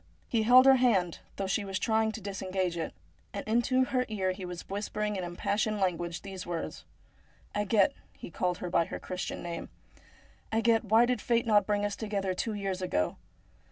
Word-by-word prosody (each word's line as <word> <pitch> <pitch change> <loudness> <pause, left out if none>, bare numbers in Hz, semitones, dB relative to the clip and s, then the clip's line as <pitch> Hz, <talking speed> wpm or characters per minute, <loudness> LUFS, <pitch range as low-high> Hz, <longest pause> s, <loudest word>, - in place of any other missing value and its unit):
He 230 - +1
held 250 +4 +7
lier 270 -1 +8
hand, 195 -9 +2 0.2
though 195 - -2
she 195 +2 0
was 195 -1 -3
trying 220 +2 +2
to 220 - -7
disengage 190 -2 -2
it; 165 - -4 0.4
and 200 - -5
into 240 +3 +3
her 255 0 0
ear 190 -4 0
he 185 0 -6
was 180 -1 -7
whispering 210 +1 -2
in 185 - -3
im 175 0 -5
passioned 215 +3 0
language 175 -2 -1
these 195 -2 -6
words: 170 -1 -5 0.7
'Agathe,' 205 -1 +3 0.2
he - - -10
called 180 +2 -1
her 180 - -5
by 170 -2 +3
her - - -6
Christian 185 0 -5
name, 170 -1 -5 0.4
' - - -29
Agathe, 225 +1 +3
why 220 +3 +5
did 245 -3 0
Fate 235 -1 +1
not 210 -2 +4
bring 205 -1 +1
us 205 - -2
together 200 -3 -2 0.2
years 195 -3 -3
ago 90 - 0
200 Hz, 190 wpm, -30 LUFS, 185-220 Hz, 0.7 s, lier